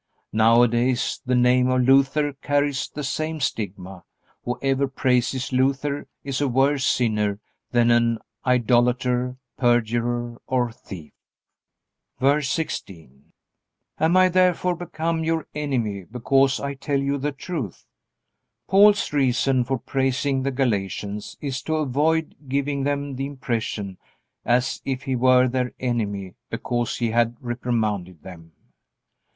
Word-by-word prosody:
Nowadays 120 +3 +3
the 125 - +2
name 125 +1 +4
of 130 0 +2
Luther 140 +3 +3
carries 145 0 -1
the 150 - -6
same 155 +3 -2
stigma. 95 - -4 0.4
Whoever 135 +2 0
praises 130 0 0
Luther 140 +2 0 0.2
is 135 0 -3
a 145 - +2
worse 135 +2 +2
sinner 105 -5 +1 0.3
than 120 -1 +3
an 120 -1 +3 0.3
idolater, 125 0 +2 0.2
perjurer, 120 0 0
or 125 -3 0
thief. 90 -7 -11 1.1
VERSE 140 +1 +2
16. 80 - -5 0.7
Am 165 +3 +3
I 185 0 +6
therefore 180 0 +2
become 165 -1 -3
your 160 -1 -1
enemy, 120 -10 -2
because 135 +4 +2
I 140 0 -3
tell 140 +1 -2
you 140 +1 -1
the 145 +2 -1
truth? 135 - -6 0.8
Paul's 200 -2 +5
reason 130 -1 +2
for 135 +2 -1
praising 135 +2 0
the 135 - 0
Galatians 105 -5 -2
is 135 -3 -3
to 160 - -2
avoid 155 +2 +1 0.2
giving 140 0 -1
them 140 -1 -2
the 135 +1 -2
impression 115 -8 -4 0.5
as 125 +2 +1
if 135 -1 -3
he 130 - -1
were 130 +1 +5
their 125 0 -1
enemy 100 -7 -2 0.2
because 120 -1 -2
he 115 -2 -1
had 120 0 +1
reprimanded 110 -8 -2
them. 80 -3 -12
130 Hz, 125 wpm, -23 LUFS, 120-140 Hz, 1.1 s, I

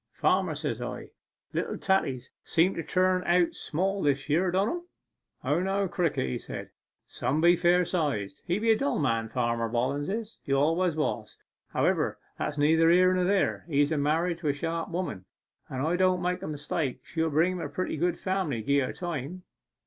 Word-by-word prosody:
"Farmer," - - +1
says - - -3
I, - - -6 0.4
"little - - -2
taties 135 -10 0
seem 175 +3 +2
to - - -3
turn 185 +3 +1
out 175 -1 +3
small 195 +5 -1
this 140 -1 +1
year, 175 +5 +3
don't 190 +4 +1
em?" 350 0 -4 0.6
"O 145 +5 +1
no, 195 +1 0
Crickett," 165 - -1
says - - -7
he, - - -42 0.3
"some 145 +4 -1
be 170 +2 +6
fair 175 +1 +3
sized." 145 - -2
He's 185 +5 0
a 225 -1 +5
dull 275 +6 0
man 115 -6 0
Farmer 115 -1 0
Bollens 130 +5 -1
is 220 +2 -4
he 140 - -2
always 165 +5 +2
was. 120 -8 -2 0.3
However, - - +1 0.2
that's 150 - -2
neither 160 +3 +4
here 185 +2 +5
nor 180 -1 +1
there; 195 +1 +1
he's 145 -1 +2
a 155 - +1
married 165 +4 +1
to 165 - -3
a 145 - +3
sharp 165 +3 -3
woman, 170 - -4 0.4
and 130 - -3
if - - 0
I 170 - +1
don't 185 -1 +2
make 180 0 -1
a - - -5
mistake 145 -3 -3
she'll 160 -1 -1
bring 160 +4 +3
him 180 -1 -4
a 145 - -4
pretty 185 +5 -3
good 175 +3 0
family, 185 - -1
gie 140 +4 +3
her 130 - -1
time. 175 0 -5
165 Hz, 190 wpm, -28 LUFS, 145-185 Hz, 0.6 s, be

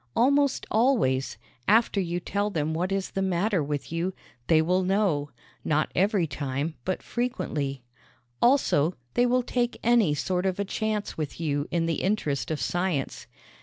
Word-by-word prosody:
Almost 280 +3 +3
always, 215 - +2 0.3
after 215 -1 +4
you 175 -1 -2
tell 200 +4 -1
them 160 -4 -1
what 180 +4 -1
is 195 -1 -1
the 195 - -2
matter 190 0 +1
with 145 0 -3
you, 175 +3 -2 0.3
they 160 - +5
will 180 +4 +2
know 185 -6 +1 0.3
not 155 0 +1
every 195 -1 +2
time, 140 +1 -3
but 185 - -2
frequently. 150 - -2 0.6
Also, 185 - +3 0.2
they 245 - +3
will 250 +1 +2
take 245 0 -1
any 230 -10 +4
sort 180 +5 -1
of 185 +1 -2
a 200 - 0
chance 210 -2 -2
with 150 0 -4
you 145 -3 -1
in 170 -1 0
the 165 -2 -1
interest 180 -8 -1
of 155 -2 -2
science. 175 -6 -2
185 Hz, 160 wpm, -27 LUFS, 155-215 Hz, 0.6 s, they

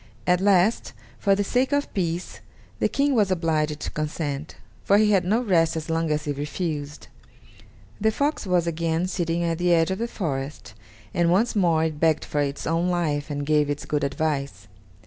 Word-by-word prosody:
At 180 0 +3
last, 195 +2 +3 0.3
for 195 -1 +3
the 205 - 0
sake 250 +6 +1
of 285 0 0
peace, 175 -2 -3 0.4
the - - +2
King 280 0 +1
was 210 -6 +3
obliged 155 -4 0
to - - -4
consent, 150 - -4 0.3
for 200 - +4
he 210 0 +4
had 195 -3 +3
no 215 +7 +1
rest 170 -8 +2
as 160 0 -4
long 165 0 0
as 150 0 0
he 145 - -1
refused. 150 0 -4 0.9
The 220 +1 +3
fox 285 0 -1
was 180 -2 +2
again 165 +1 -1
sitting 170 -2 -1
at 165 -1 -1
the 175 0 +2
edge 165 +1 +3
of 190 - -2
the 235 - -1
forest, 145 -9 -4 0.4
and 170 -1 +2
once 220 +7 +2
more 170 -5 +3
it 155 -2 -2
begged 160 -1 +2
for 145 - -1
its 140 -1 -3
own 165 +3 +1
life 155 -5 -1
and 145 -1 -3
gave 150 -1 +2
its 145 0 -3
good 150 -1 -1
advice. 140 - -2
165 Hz, 190 wpm, -24 LUFS, 150-190 Hz, 0.9 s, for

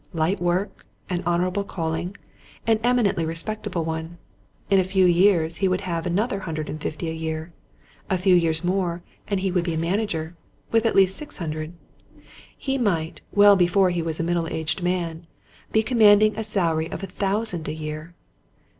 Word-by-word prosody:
Light 170 +4 0
work, 175 +3 -1 0.2
an 175 -1 0
honourable 180 +3 +1
calling, 170 0 -3 0.5
an 225 -1 +3
eminently 240 -8 +2
respectable 170 +2 -3
one. 160 +1 -4 0.5
In 195 - +6
a - - +3
few 190 0 +2
years 175 -2 +3
he 195 - +2
would 185 +1 0
have 170 -3 -3
another 200 +4 0
hundred 155 -4 -4
and 155 - -6
fifty 155 +2 -4
a 160 - -2
year: 160 +1 -4 0.6
a 185 - +2
few 185 +1 +3
years 165 -1 +2
more, 175 -1 -1 0.2
and 200 -2 -1
he 190 -1 0
would 180 -1 +1
be 170 -2 -2
a - - -2
manager, 170 -1 -1 0.4
with 225 0 +3
at - - 0
least 195 -1 +5
six 300 - -7
hundred: 155 -1 -4 0.8
he 270 -1 -2
might, 170 -8 -1
well 205 +1 +7
before 185 +1 +3
he 175 -1 -1
was 160 -1 -3
a - - 0
middle 170 0 0
aged 160 +3 -2
man, 170 -2 -2 0.4
be 220 - +3
commanding 215 -3 +5
a 220 - -3
salary 165 -6 0
of - - -6
a - - -1
thousand 195 -2 -1
a - - -2
year. 155 +2 -6
175 Hz, 180 wpm, -24 LUFS, 165-200 Hz, 0.8 s, well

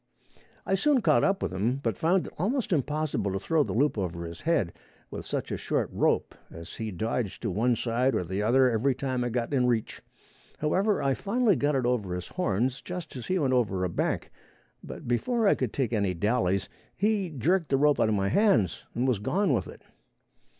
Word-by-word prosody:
I - - 0
soon 270 +6 +3
caught - - +3
up 195 0 +1
with - - -2
him, 110 +7 0
but 115 -6 -2
found 175 - +2
it - - -9
almost 225 - 0
impossible 150 - -1
to 95 - -1
throw 160 - +1
the - - -4
loop 140 -2 +2
over 85 -2 -3
his 85 0 -8
head 155 - +1 0.4
with - - -7
such - - -3
a - - -1
short - - -1
rope, - - +1 0.2
as 85 +2 -10
he 110 -1 -3
dodged 110 +3 -3
to 110 - -1
one 120 +6 +2
side 125 +3 0
or - - 0
the 95 +4 -3
other 130 +5 +4
every 125 +3 +1
time 130 -2 -2
I 120 - -1
got 120 +3 -2
in 125 -2 +3
reach. 115 -3 -1 0.6
However, 190 +7 +1
I 135 -1 +2
finally 210 - +1
got 145 +2 +1
it 130 -2 0
over 110 -8 0
his 90 - -6
horns 125 - -1
just 175 +4 -7
as 125 - -7
he 185 - +1
went 135 -6 +1
over 100 -7 +1
a 90 - 0
bank, - - -2 0.5
but - - -9
before 220 - +1
I - - +6
could 125 -5 -2
take 125 -4 -1
any 100 -4 0
dallys, 100 -1 +1 0.3
he 205 -2 +1
jerked 165 +4 0
the 135 - +3
rope 145 +1 +3
out 110 - +3
of 110 - +2
my 100 0 0
hands 115 - +2
and 125 +2 0
was 125 -6 +1
gone 180 - +1
with 100 -7 0
it. - - -12
125 Hz, 215 wpm, -28 LUFS, 105-160 Hz, 0.6 s, I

